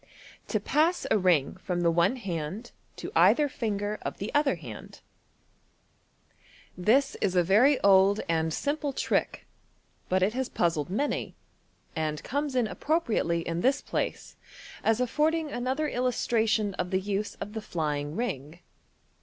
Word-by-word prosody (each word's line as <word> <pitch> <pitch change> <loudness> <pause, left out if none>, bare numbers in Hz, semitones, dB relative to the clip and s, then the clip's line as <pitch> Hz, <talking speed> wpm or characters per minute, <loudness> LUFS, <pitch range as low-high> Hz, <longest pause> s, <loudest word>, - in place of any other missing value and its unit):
To - - 0
Pass 325 +4 +1
a - - +5
Ring 180 -4 +2
from 180 -2 -3
the 170 -1 +3
one 175 +8 +2
Hand 190 0 -5 0.2
to - - -7
either 300 -1 +5
Finger 210 -5 -3
op - - -4
the 200 - -5
other 290 -7 +3
Hand. 125 -11 -10 0.9
— - - -41 0.6
This 225 +10 +3
is 185 -2 +1
a 180 - +4
very 240 - +4
old 195 +1 +5
and 160 -1 0
simple 290 - -2
trick, - - -1 0.6
but 185 0 +2
it 205 +3 +1
has 260 0 -2
puzzled 165 -3 0
many, 280 +10 -2 0.6
and 155 -2 -2
comes 285 0 -2
in 250 -2 +3
appropriately 225 - 0
in 170 +1 -2
this 270 +5 +3
place, - - -4 0.5
as 225 +1 +2
afford 300 +6 +2
ing 315 -3 -3
another 260 +5 -1
illustration 225 -5 0
of 180 - -1
the 190 - +1
use 205 +1 -3
of 210 - -7
the 220 - -4
"flying 150 -5 -3
ring." 160 - -4
205 Hz, 150 wpm, -28 LUFS, 175-255 Hz, 0.9 s, a